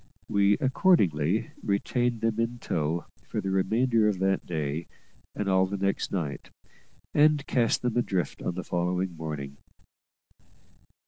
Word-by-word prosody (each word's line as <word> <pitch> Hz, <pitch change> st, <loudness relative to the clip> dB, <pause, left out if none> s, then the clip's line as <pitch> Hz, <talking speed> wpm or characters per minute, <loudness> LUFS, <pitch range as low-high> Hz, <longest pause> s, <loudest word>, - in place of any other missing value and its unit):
We 100 Hz, 0 st, +3 dB
accordingly 105 Hz, -, +2 dB
retained 120 Hz, +4 st, 0 dB
them 115 Hz, -1 st, 0 dB
in 115 Hz, +1 st, -1 dB
tow 80 Hz, -5 st, -2 dB, 0.2 s
for -, -, -3 dB
the 95 Hz, -, -2 dB
remainder 110 Hz, +4 st, +2 dB
of 105 Hz, -3 st, +1 dB
that 95 Hz, +1 st, 0 dB
day 80 Hz, -1 st, -3 dB, 0.5 s
and 105 Hz, -, -2 dB
all 95 Hz, -1 st, +3 dB
next 100 Hz, 0 st, -1 dB
night, 80 Hz, -7 st, -3 dB, 0.6 s
and 150 Hz, -1 st, +4 dB
cast 120 Hz, -2 st, +1 dB
them 125 Hz, -2 st, 0 dB
adrift 95 Hz, -, -1 dB
on 85 Hz, -, -2 dB
the 90 Hz, -, -4 dB
following 90 Hz, +1 st, -1 dB
morning. 75 Hz, -3 st, -6 dB
95 Hz, 130 wpm, -27 LUFS, 85-115 Hz, 0.6 s, and